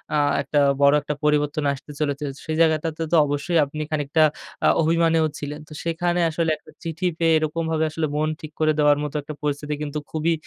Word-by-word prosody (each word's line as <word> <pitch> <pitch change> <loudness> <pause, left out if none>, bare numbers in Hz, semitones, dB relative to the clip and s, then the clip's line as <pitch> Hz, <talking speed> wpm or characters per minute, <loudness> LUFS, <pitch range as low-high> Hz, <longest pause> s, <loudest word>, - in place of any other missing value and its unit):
আ - - +3 0.2
একটা 145 - 0 0.2
বড় 140 +1 +6
একটা 150 +1 -3
পরিবর্তন 150 0 +1
আসতে 140 +2 -10
চলেছে। 145 -1 -1 0.2
সেই 155 -1 -2
জায়গাটাতে 160 0 +1
তো 170 - +4
অবশ্যই 145 +4 -1
আপনি 155 +2 -6
খানিকটা 150 +1 +1 0.4
আ - - +6
অভিমানীও 165 0 +3
ছিলেন। 150 +1 -5
তো 155 - -11
সেখানে 175 +1 0
আসলে 165 +1 -1
একটা - - -18
চিঠি 165 +2 -4
পেয়ে, 165 -1 +4
এরকমভাবে 160 +1 -1
আসলে 155 -1 -1
মন 155 +1 +1
ঠিক 155 -1 -8
করে 155 0 +3
দেওয়ার 145 -1 +5
মতো 150 0 -5
একটা 155 - -7
পরিস্থিতি 150 0 -2
কিন্তু, 150 0 -3
খুবই 160 +1 +1
155 Hz, 190 wpm, -23 LUFS, 150-165 Hz, 0.4 s, বড়